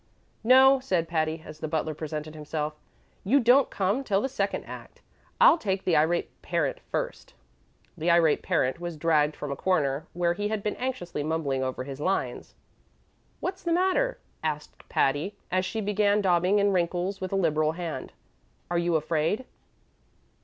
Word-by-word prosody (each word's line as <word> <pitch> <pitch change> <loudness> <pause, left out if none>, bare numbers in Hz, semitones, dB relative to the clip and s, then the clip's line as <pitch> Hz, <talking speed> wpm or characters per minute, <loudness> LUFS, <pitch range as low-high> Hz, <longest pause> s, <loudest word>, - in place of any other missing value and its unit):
"No," 265 +3 +7
said 185 -10 0
Patty, 160 -1 -1
as 155 - -10
the 155 - -3
butler 155 0 -1
presented 155 0 -5
himself; 150 0 -4 0.5
"you 255 +9 +4
don't 250 +2 +5
come 200 +7 0
till 200 -6 +1
the 265 - -1
second 270 - -2
act. - - -11 0.4
I'll - - +7
take 190 -5 -1
the 175 - +3
Irate 160 +3 +1
Parent 165 -6 -1
first." - - -4 0.6
The 165 +3 -1
Irate 170 -3 +4
Parent 130 +5 0
was 175 -2 -5
dragged 150 -1 +2
from 145 - -5
a - - -2
corner 145 -4 0
where 175 0 +1
he 205 +3 -2
had 215 -1 -3
been 210 - -1
anxiously 245 - -3
mumbling 145 -3 -1
over 130 0 -3
his 135 +1 -7
lines. 190 +5 -2 0.9
"What's 370 0 -3
the 340 -1 0
matter?" 380 +8 +2 0.2
asked 150 -1 -5
Patty, 145 +9 +1 0.2
as 185 +1 +1
she 220 +3 -3
began 205 0 +2
daubing 180 +1 +3
in 200 0 +3
wrinkles 180 +2 -1
with 185 - -4
a - - 0
liberal 155 -4 +2
hand; 165 -6 -5 0.6
"are 175 - +2
you 170 -1 +1
afraid?" 160 +9 0
175 Hz, 165 wpm, -27 LUFS, 155-205 Hz, 0.9 s, No